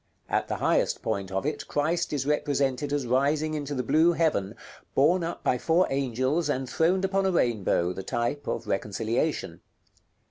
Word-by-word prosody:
At - - 0
the - - -2
highest - - +1
point 100 -1 -2
of 95 +4 -2
it 150 0 -3
Christ 160 +4 0
is 140 -3 -1
represented 140 -1 0
as 145 -3 0
rising 145 +5 +1
into 145 -1 -3
the 130 - -1
blue 160 +8 +4
heaven, 150 - 0 0.4
borne 170 +6 +4
up 165 - -5
by 125 - +1
four 170 +6 +3
angels, 135 +4 0
and 130 -2 -1
throned 180 +8 +2
upon 195 0 +1
a - - +2
rainbow, 105 - +1
the 95 - -6
type 120 +8 -2
of - - -2
reconciliation. 110 - -2
145 Hz, 170 wpm, -27 LUFS, 120-160 Hz, 0.4 s, blue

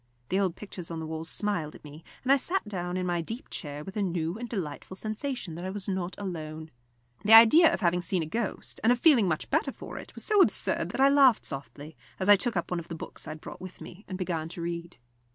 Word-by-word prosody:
The 190 - +1
old 185 -4 0
pictures 190 -4 -8
on 165 -1 -4
the 160 - -5
walls 160 +1 -5
smiled 185 -8 -1
at - - -14
me, 150 +2 -11 0.2
and 260 - +2
I 275 - +7
sat 345 - -2
down 180 -3 -3
in 185 - -1
my 175 -1 0
deep 225 - -7
chair 145 -2 -6
with 195 - -9
a 210 - -1
new 170 -2 -1
and 240 +2 -6
delightful 185 -4 -5
sensation 215 - -4
that 170 +2 -7
I 185 - -3
was 195 0 -1
not 185 -2 -2
alone. 160 -5 -6 0.5
The 215 - +5
idea 235 +10 +8
of - - -2
having 175 -1 +2
seen 175 0 -1
a - - -4
ghost, 210 +6 -3
and 225 - +4
of 245 - +3
feeling 250 - +5
much 155 -3 0
the - - -19
better 300 -1 +1
for - - -8
it, - - -12
was - - -5
so 420 -2 +4
absurd - - +2
that - - -2
I 275 - +7
laughed 275 -5 +5
softly, 145 +2 -7 0.2
as 190 +1 0
I 205 - +10
took 225 +1 -1
up 175 +1 -2
one 180 - 0
of 165 - -9
the 165 - -6
books 160 - -8
I - - -4
had 155 0 -9
brought - - -9
with 185 -1 -9
me 185 +4 -11
and 185 - -5
began 170 -4 -3
to 175 0 -7
read. 170 -2 -5
185 Hz, 260 wpm, -28 LUFS, 165-220 Hz, 0.5 s, I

